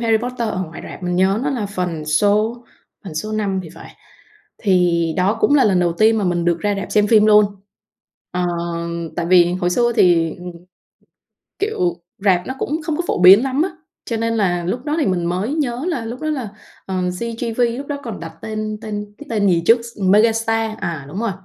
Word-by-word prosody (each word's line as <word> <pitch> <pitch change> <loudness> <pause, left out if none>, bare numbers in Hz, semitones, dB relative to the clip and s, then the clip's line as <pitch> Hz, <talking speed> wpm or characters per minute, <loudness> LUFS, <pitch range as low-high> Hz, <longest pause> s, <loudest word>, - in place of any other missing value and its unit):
"Harry 225 -1 +3
Potter" 240 -1 -3
ở 190 -3 -2
ngoài 165 -1 -8
rạp - - -10
mình 180 0 -1
nhớ 190 +3 +2
nó 280 - 0
là 240 -7 -2
phần 180 -6 -4
số 210 +8 +2 0.5
phần 175 - -8
số 215 +7 -4
5 200 -3 -1
thì 165 - -10
phải, - - -13 0.6
thì 175 -4 +2
đó 195 +4 +2
cũng 290 - +4
là 280 - +5
lần 190 -4 +3
đầu 175 -1 +1
tiên 220 +4 +3
mà 200 - -1
mình 175 -1 0
được 170 -1 +1
ra 205 -1 0
rạp 195 - -5
xem 210 -1 +3
phim 215 -1 +5
luôn. 210 0 +7 0.9
Ờ, 180 0 -1 0.7
tại 170 - -1
vì 175 -1 +5
hồi 180 -1 -1
xưa 240 +5 +2
thì, 165 -3 +3 1.2
kiểu, 180 - -1 0.2
rạp 190 -3 +2
nó 260 - -4
cũng 310 +4 -2
không 305 0 -2
có 350 - -1
phổ - - 0
biến 195 +6 +9
lắm 270 +3 0
á, 380 - -1 0.3
cho 230 - -3
nên 230 +1 -1
là 175 -4 0
lúc 240 +9 -3
đó 300 +1 -1
thì - - +1
mình 180 -2 0
mới 190 - -1
nhớ 260 -3 -2
là 265 -10 -2
lúc 235 +3 -6
đó 310 0 -2
là, 260 -8 -3 0.4
ờ, 190 - -3 0.2
CGV 230 0 -3 0.2
lúc 275 - -6
đó 290 - -3
còn 225 -4 -6
đặt 165 -1 -7
tên 215 -1 -4
tên 210 -1 -6
cái 295 - -11
tên 205 -3 +2
gì 170 -2 +2
trước 230 +1 +6
s 235 -1 -11
Megastar, 225 +2 +2
à, 155 -5 -4
đúng 185 +8 -5
rồi, 230 -2 0
210 Hz, 215 wpm, -19 LUFS, 180-230 Hz, 1.2 s, biến